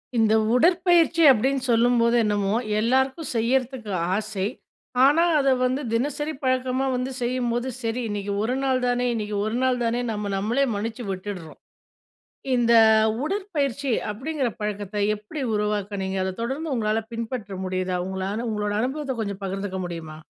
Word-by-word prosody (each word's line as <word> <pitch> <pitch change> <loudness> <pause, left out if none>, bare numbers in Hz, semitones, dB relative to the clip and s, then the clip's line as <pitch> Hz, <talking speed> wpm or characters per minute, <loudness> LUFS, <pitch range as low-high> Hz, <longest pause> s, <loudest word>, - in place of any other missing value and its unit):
இந்த 220 -1 +3 0.2
உடற்பயிற்சி 340 +2 +4
அப்பிடின்னு 265 +2 +3
சொல்லும்போது, 235 0 +3
என்னமோ 205 -2 0 0.3
எல்லாருக்கும் 265 +6 +1
செய்யிறதுக்கு 240 -1 0 0.2
ஆசை. 205 -2 -2 0.6
ஆனா, 295 +5 +5 0.2
அத 275 - +2 0.2
வந்து 255 +3 0
தினசரி 295 +6 -1
பழக்கமா 255 0 +1
வந்து 250 +1 -2
செய்யும்போது, 240 0 -1
சரி 230 +1 -2
இன்னைக்கு 205 -1 -3
ஒரு 245 +3 0
நாள் 260 -1 +2
தானே, 245 0 +1
இன்னைக்கு 210 -2 -3
ஒரு 220 +2 -1
நாள் 255 -1 +1
தானேன்னு 235 0 0
நம்ம 205 -1 -3
நம்மளே 225 +8 +1
மன்னிச்சு 225 +3 -4
விட்டுட்றோம். 185 -4 -7 1.0
இந்த 235 -1 +2 0.5
உடற்பயிற்சி 295 - -1 0.2
அப்பிடிங்கிற 265 +4 -2
பழக்கத்த 210 -1 -4 0.2
எப்பிடி 210 +9 -7
உருவாக்குனீங்க? 205 -2 -1
அத 190 0 -3
தொடர்ந்து 275 +6 -2
உங்களால 215 -1 +1
பின்பற்ற 230 -3 -4
முடியுதா? 185 0 -1
உங்ளான 190 +4 -3
உங்களோட 210 -1 -1
அனுபவத்த 270 +2 -2
கொஞ்சம் 200 -2 -4
பகிர்ந்துக்க 195 0 -3
முடியுமா? 160 -3 -7
235 Hz, 135 wpm, -24 LUFS, 205-265 Hz, 1.0 s, ஆனா